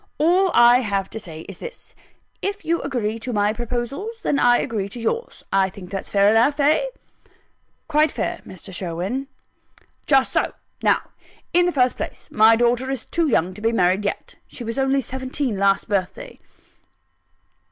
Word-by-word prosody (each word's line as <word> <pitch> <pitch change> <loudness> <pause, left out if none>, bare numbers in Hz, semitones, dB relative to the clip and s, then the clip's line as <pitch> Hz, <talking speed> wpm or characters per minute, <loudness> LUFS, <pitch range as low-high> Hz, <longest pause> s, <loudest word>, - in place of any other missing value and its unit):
All 360 +5 +3
I 240 +1 +7
have 200 -5 -2
to 220 - -5
say 160 -6 -9
is 195 +2 -10
this: - - -10 0.5
if 405 +1 -3
you 335 +1 +1
agree 230 -5 -2
to 250 +3 -5
my 210 -1 +1
proposals, 245 - -4
then 280 - +1
I 245 0 +5
agree 205 -4 -2
to 240 - -8
yours. 460 - -3
I 195 -1 +3
think 185 -1 -11
that's 195 - -4
fair 200 0 +4
enough 245 +7 +3
Eh?" 300 +11 +3 1.0
"Quite 305 -1 +3
fair, 345 0 -3
Mr. 185 +1 -11
Sherwin." 185 +9 -3 0.8
"Just 270 -2 +4
so. - - +1 0.3
Now, - - +3 0.5
in 355 0 +5
the - - +1
first 255 -5 +2
place, - - -6
my 220 +1 +6
daughter 240 +2 +1
is 270 -4 -3
too 335 -1 0
young 185 - +1
to 210 - -11
be 225 +1 +2
married 185 -2 +2
yet. 205 - -4
She 245 - -9
was 230 +3 -3
only 270 0 +2
seventeen 260 -3 -3
last 195 0 +2
birthday." 195 -3 -3
240 Hz, 170 wpm, -22 LUFS, 200-280 Hz, 1.0 s, I